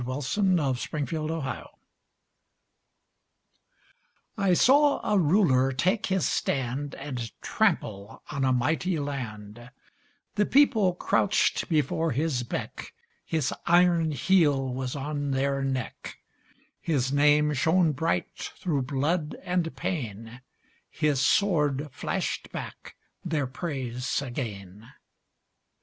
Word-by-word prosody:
VERSE: 130 Hz, +1 st, -3 dB
THE 175 Hz, -9 st, +3 dB
THREE 150 Hz, +2 st, -3 dB
RULERS 155 Hz, -3 st, -3 dB, 2.7 s
I 195 Hz, -3 st, +2 dB
saw 285 Hz, -, +5 dB
a 210 Hz, -, +3 dB
Ruler 145 Hz, -7 st, +3 dB
take 185 Hz, -, 0 dB
his 190 Hz, -3 st, +1 dB
stand 135 Hz, +2 st, -2 dB
And 125 Hz, -6 st, -5 dB
trample 100 Hz, +1 st, -1 dB
on 140 Hz, -2 st, -2 dB
a 130 Hz, -, +3 dB
mighty 160 Hz, +8 st, +1 dB
land; 120 Hz, -5 st, -6 dB, 0.6 s
The 205 Hz, 0 st, +1 dB
People 225 Hz, -10 st, +4 dB
crouched 200 Hz, +3 st, +1 dB
before 160 Hz, 0 st, +1 dB
his 140 Hz, -1 st, 0 dB
beck, 120 Hz, -, -6 dB, 0.3 s
His 155 Hz, -5 st, -1 dB
iron 170 Hz, -1 st, +4 dB
heel 145 Hz, -5 st, +2 dB
was 130 Hz, 0 st, -3 dB
on 145 Hz, 0 st, -3 dB
their 135 Hz, 0 st, 0 dB
neck, 130 Hz, -3 st, -4 dB, 0.6 s
His 135 Hz, -4 st, 0 dB
name 150 Hz, +1 st, +4 dB
shone 160 Hz, +4 st, +3 dB
bright 160 Hz, +4 st, -2 dB, 0.2 s
through 155 Hz, -7 st, -1 dB
blood 150 Hz, +5 st, -1 dB
and 180 Hz, -2 st, -1 dB
pain, 115 Hz, -, -5 dB, 0.5 s
His 150 Hz, -4 st, 0 dB
sword 150 Hz, -5 st, +2 dB
flashed -, -, -3 dB
back -, -, -8 dB, 0.3 s
their 160 Hz, -5 st, -1 dB
praise 130 Hz, -3 st, -3 dB
again. 110 Hz, -6 st, -6 dB
145 Hz, 105 wpm, -27 LUFS, 130-165 Hz, 2.7 s, saw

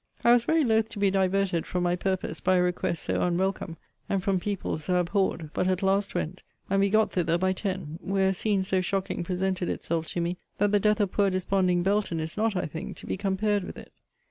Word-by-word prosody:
I 235 Hz, -, +6 dB
was 240 Hz, -1 st, +5 dB
very 320 Hz, +2 st, +3 dB
loth 220 Hz, -3 st, +2 dB
to 230 Hz, -, -9 dB
be 200 Hz, -1 st, +3 dB
diverted 190 Hz, -2 st, +1 dB
from 180 Hz, -1 st, -1 dB
my 175 Hz, 0 st, +2 dB
purpose 185 Hz, -3 st, -2 dB
by 185 Hz, 0 st, +2 dB
a 180 Hz, -, +4 dB
request 180 Hz, -1 st, -1 dB
so -, -, -1 dB
unwelcome, 180 Hz, -1 st, -1 dB, 0.3 s
and 195 Hz, -2 st, 0 dB
from 195 Hz, -2 st, +1 dB
people 200 Hz, -4 st, -3 dB
so 180 Hz, +4 st, -1 dB
abhorred; 175 Hz, -3 st, 0 dB
but 180 Hz, -, 0 dB
at 185 Hz, +1 st, 0 dB
last 195 Hz, +1 st, +1 dB
went, 185 Hz, +4 st, -3 dB, 0.3 s
and 195 Hz, -, +3 dB
we 200 Hz, 0 st, +3 dB
got 215 Hz, +2 st, +3 dB
thither 170 Hz, -2 st, +1 dB
by 185 Hz, +1 st, +1 dB
ten; 185 Hz, -5 st, -4 dB
where 190 Hz, 0 st, +1 dB
a -, -, +1 dB
scene 200 Hz, 0 st, 0 dB
so 190 Hz, 0 st, +1 dB
shocking 190 Hz, -1 st, -2 dB
presented 185 Hz, 0 st, -1 dB
itself 165 Hz, -1 st, -2 dB
to -, -, -3 dB
me, 170 Hz, +1 st, -1 dB, 0.2 s
that 205 Hz, 0 st, +2 dB
the 205 Hz, -, +4 dB
death 210 Hz, +1 st, +2 dB
of 200 Hz, -3 st, +1 dB
poor 200 Hz, -1 st, +2 dB
desponding 185 Hz, -1 st, +1 dB
Belton 195 Hz, -3 st, +1 dB
is 160 Hz, +1 st, -4 dB
not, 220 Hz, -1 st, 0 dB
I 180 Hz, -, 0 dB
think, 160 Hz, +1 st, -6 dB
to -, -, -10 dB
be -, -, -2 dB
compared 200 Hz, +1 st, 0 dB
with -, -, -8 dB
it. -, -, -11 dB
190 Hz, 230 wpm, -27 LUFS, 180-200 Hz, 0.3 s, I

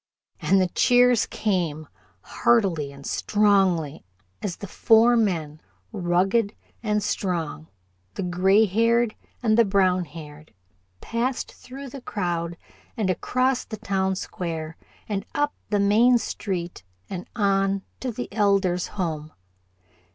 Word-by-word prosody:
And 195 Hz, -, +3 dB
the 185 Hz, -, +3 dB
cheers 245 Hz, +2 st, +4 dB
came, 170 Hz, -7 st, -1 dB, 0.3 s
heartily 185 Hz, -12 st, +1 dB
and 140 Hz, 0 st, -12 dB
strongly, 190 Hz, -7 st, +2 dB, 0.4 s
as 190 Hz, -5 st, -3 dB
the -, -, -8 dB
four 225 Hz, +4 st, +4 dB
men, 165 Hz, -9 st, 0 dB, 0.3 s
rugged 195 Hz, +2 st, +1 dB, 0.3 s
and 210 Hz, -2 st, 0 dB
strong, 170 Hz, -, -2 dB, 0.5 s
the 195 Hz, -, -3 dB
gray 190 Hz, +4 st, +4 dB
haired 230 Hz, +3 st, +2 dB, 0.3 s
and 220 Hz, -1 st, +3 dB
the -, -, +8 dB
brown 190 Hz, -3 st, +2 dB
haired, 150 Hz, -5 st, -12 dB, 0.5 s
passed 240 Hz, +3 st, -2 dB
through 270 Hz, +2 st, -10 dB
the 270 Hz, +1 st, -9 dB
crowd 170 Hz, -6 st, -3 dB, 0.4 s
and 200 Hz, -4 st, +1 dB
across 255 Hz, +7 st, 0 dB
the 220 Hz, -, -7 dB
town 190 Hz, -1 st, -1 dB
square 165 Hz, -3 st, -5 dB, 0.3 s
and 200 Hz, -2 st, -2 dB
up 290 Hz, 0 st, +1 dB, 0.2 s
the 205 Hz, -, +1 dB
main 225 Hz, +5 st, +5 dB
street, 180 Hz, -, -4 dB, 0.2 s
and 180 Hz, -2 st, -7 dB
on 195 Hz, -2 st, +1 dB, 0.2 s
to 255 Hz, -, -3 dB
the 245 Hz, +2 st, -5 dB
Elder's 195 Hz, -4 st, +2 dB
home. 155 Hz, -4 st, -3 dB
195 Hz, 120 wpm, -24 LUFS, 175-225 Hz, 0.5 s, the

